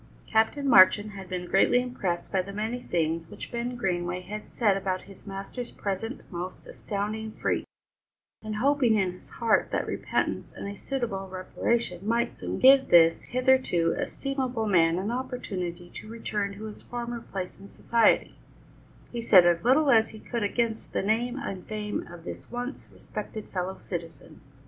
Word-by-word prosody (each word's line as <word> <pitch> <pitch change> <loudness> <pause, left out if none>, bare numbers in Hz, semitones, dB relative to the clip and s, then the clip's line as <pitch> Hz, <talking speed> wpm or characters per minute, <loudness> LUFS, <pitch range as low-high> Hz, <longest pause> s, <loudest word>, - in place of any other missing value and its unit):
Captain 225 +6 +2
Marchand 205 -2 +7
had 195 -2 -9
been 180 -1 -3
greatly 195 +7 +4
impressed 220 -9 -3
by 190 - +2
the 195 +2 -8
many 220 +4 -3
things 165 -4 -1
which - - -9
Ben 240 +1 -3
Greenway 180 -5 -1
had 210 +4 -7
said 210 -5 +2
about 185 -1 -2
his 195 +1 -14
master's 195 +5 -6
present 215 +6 -4
most 180 +1 -6
astounding 215 +2 -4
freak, - - -1 0.8
and 215 0 -4
hoping 255 -1 +3
in 190 -3 +2
his 180 - -14
heart 230 -2 +2
that - - -1
repentance - - -2
and - - -6
a 200 - -4
suitable 215 -6 -3
reparation 185 +1 -1
might 235 +1 +1
soon - - -4
give 265 +1 +7
this 165 -1 +6
hitherto 255 -10 +2
estimable 260 -4 -2
man 170 -4 +4
an 195 +4 -2
opportunity 190 -9 -4
to - - -9
return 210 -3 -3
to 215 - -8
his 215 -1 -6
former 240 0 -5
place 190 -5 -6
in 200 - -12
society, 230 -1 +2 0.8
he 235 - -3
said 190 -6 +7
as 170 -1 +3
little 275 +4 +5
as 225 -1 +5
he 215 - -11
could 235 +1 -4
against 225 +2 -1
the - - 0
name 235 +5 +1
and 195 -10 -5
fame 210 -1 -3
of 170 -1 -11
this - - -8
once 245 +2 -5
respected 215 -1 -7
fellow 185 0 -3
citizen. 165 -3 -7
210 Hz, 165 wpm, -27 LUFS, 185-240 Hz, 0.8 s, Marchand